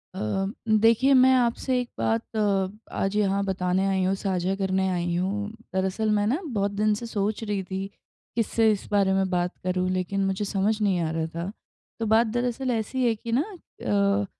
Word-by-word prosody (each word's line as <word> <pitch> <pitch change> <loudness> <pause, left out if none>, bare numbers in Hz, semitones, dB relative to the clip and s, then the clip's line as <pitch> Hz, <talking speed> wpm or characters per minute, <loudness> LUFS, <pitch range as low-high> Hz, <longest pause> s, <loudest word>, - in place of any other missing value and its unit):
अ, - - -5 0.5
देखिए 225 +5 +5
मैं 260 0 +6
आपसे 250 +1 +1
एक 245 -1 -4
बात 115 - -1
अ 200 -3 +1 0.3
आज 195 +1 0
यहाँ 200 -1 +2
बताने 190 0 0
आई 190 -1 +1
हूँ, 190 +1 +1
साझा 190 -1 -1
करने 190 -1 0
आई 175 -1 -1
हूँ। 200 +4 -1 0.3
दरअसल 190 +3 0
मैं 205 0 +2
न 265 +9 +1
बहुत 200 -1 0
दिन 210 +1 +1
से 225 +3 -4
सोच 215 0 -2
रही 205 -2 -2
थी 190 +1 -4 0.5
किससे 225 -1 +2
इस 205 - -3
बारे 200 -2 +3
में 190 0 +1
बात 180 -1 0
करूँ 185 0 0
लेकिन 185 +2 -1
मुझे 195 +2 -1
समझ 210 +2 0
नहीं 195 -4 +2
आ 160 - -1
रहा 160 0 -1
था। 170 +3 -3 0.5
तो 225 - -1
बात 220 +2 +4
दरअसल 245 +3 -1
ऐसी 245 +3 -1
है 230 -2 +2
कि 230 +2 -7
न - - +3
अ, 205 - -1
200 Hz, 190 wpm, -26 LUFS, 190-225 Hz, 0.5 s, मैं